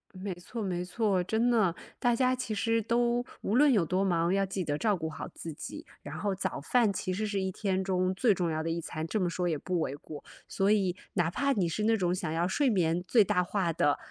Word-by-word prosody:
没 190 +1 -5
错 185 +6 -7
没 180 -3 -2
错。 195 -1 +1
真 220 +6 +1
的， 215 -8 +3 0.2
大 240 -1 +2
家 255 +1 +2
其 250 -3 -4
实 225 +2 +1
都 240 +2 +1 0.2
无 210 - -1
论 285 +1 +6
有 205 -7 +4
多 185 +4 0
忙， 170 -2 +2
要 195 +1 +2
记 190 0 -3
得 145 -3 -1
照 210 +4 +2
顾 160 -3 -4
好 160 - -6
自 165 - -6
己， - - -8 0.2
然 145 - -7
后 200 +1 -1
早 185 - -3
饭 225 - +2
其 185 - -3
实 205 +4 -1
是 205 -2 -1
一 190 0 -1
天 190 -1 -1
中 185 -1 +1
最 220 +4 +3
重 175 -3 -1
要 155 0 -1
的 165 - -2
一 165 +1 -1
餐， 160 -1 -4
这 215 - -1
么 180 - +1
说 175 +1 -1
也 160 - 0
不 180 +4 -2
为 140 -3 -2
过。 145 0 -10 0.2
所 195 +1 +1
以 195 -4 +2 0.2
哪 175 -3 +1
怕 280 +9 +1
你 190 -7 +1
是 170 +6 -2
那 225 0 +3
种 180 -3 +1
想 180 -3 -3
要 165 +2 +1
睡 275 +8 +2
眠 175 -5 +1
最 230 -4 +5
大 180 -1 +1
化 180 -2 -1
的 145 -2 +2
190 Hz, 270 characters per minute, -30 LUFS, 170-215 Hz, 0.2 s, 论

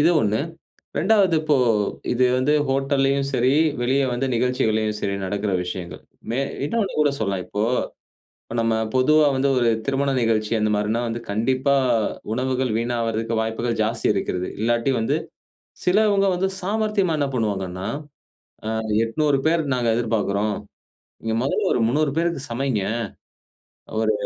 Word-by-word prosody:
இது 160 +4 +5
1, 105 -2 +1 0.6
2வது 195 -2 +3
இப்போ 155 -2 +2 0.6
இது 125 +1 +2
வந்து 130 +4 +2 0.2
ஹோட்டல்லயும் 135 0 +1
சரி, 130 -1 +2 0.3
வெளியே 135 +3 +2
வந்து 130 +2 -1
நிகழ்ச்சிகலேயும் 110 -4 +1
சரி 100 -1 -1
நடக்குற 100 +1 -2
விஷயங்கள். 90 -1 -6 0.3
மே 120 - 0 0.3
இன்னொன்னு 215 +5 -1
கூட 145 -1 +3
சொல்லலாம் 100 -4 -1
இப்போ 105 +3 -2 0.8
இப்ப 115 - -7
நம்ம 115 0 +1 0.2
பொதுவா 150 +4 +5
வந்து 135 +1 +2
ஒரு 120 -1 +3 0.2
திருமண 140 +1 0
நிகழ்ச்சி 110 -2 +1
அந்த 105 0 +1
மாரின்னா 105 +3 0
வந்து 115 +1 -4
கண்டிப்பா 130 +6 +1 0.6
உணவுகள் 130 0 0
வீணாவறதுக்கு 115 -1 -1
வாய்ப்புகள் 115 +1 -2
ஜாஸ்தி 115 +1 -1
இருக்கிறது. 90 -1 -2
இல்லாட்டி 120 +3 +1
வந்து 115 +6 +1 0.7
சிலவங்க 200 +1 +3
வந்து 185 +2 +1
சாமர்த்தியமா 205 -3 0
என்ன 140 - +1
பண்ணுவாங்கன்னா, 95 -5 -2 0.8
அ - - -1 0.3
800 145 +4 +1
பேரு 165 +1 +3
நாங்க 120 -2 0
எதிர்பார்க்குறோம். 105 -3 0 0.7
நீங்க 110 0 -1
முதல்ல 135 - 0
ஒரு - - +1
300 150 +4 +1
பேருக்கு 170 -4 0
சமைங்க. 120 -3 -1 1.2
ஒரு - - +3
120 Hz, 135 wpm, -23 LUFS, 110-140 Hz, 1.2 s, இது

